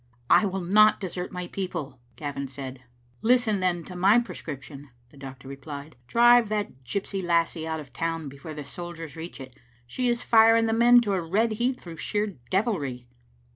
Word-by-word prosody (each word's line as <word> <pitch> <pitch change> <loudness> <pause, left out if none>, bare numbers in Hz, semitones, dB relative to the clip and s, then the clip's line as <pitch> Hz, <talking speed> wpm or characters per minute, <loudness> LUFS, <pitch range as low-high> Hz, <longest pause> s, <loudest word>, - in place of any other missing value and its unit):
" 120 - -34
I 205 - +1
will 190 0 -3
not 210 +4 +5
desert 180 -2 -5
my 180 -1 -4
people," 175 -8 -5 0.2
Gavin 140 -2 -4
said, 130 -1 -8 0.4
"Listen, 230 -3 +3
then, 180 -2 0
to 180 - -10
my 195 +5 +5
prescription," 145 - -5 0.2
the - - -18
doctor 135 -1 -10
re 140 - -6
plied. 145 +2 -9
" - - -36
Drive 240 - +5
that 205 -11 -3
gypsy 195 +5 -3
lassie 170 -1 +1
out 160 0 -2
of 135 -5 -11
the - - -15
town 165 -2 -2
before 140 +3 -9
the 150 -2 -7
soldiers 165 -1 -8
reach 165 0 -8
it. 130 -2 -10 0.3
She 245 - -1
is 240 0 -1
firing 225 0 +5
the 225 - +1
men 240 +1 +6
to 205 -4 -1
a 190 - 0
red 205 +8 +1
heat 245 +4 -1
through 165 -2 -10
sheer 210 +5 -1 0.2
devilry." 155 - -1
175 Hz, 195 wpm, -26 LUFS, 145-215 Hz, 0.4 s, men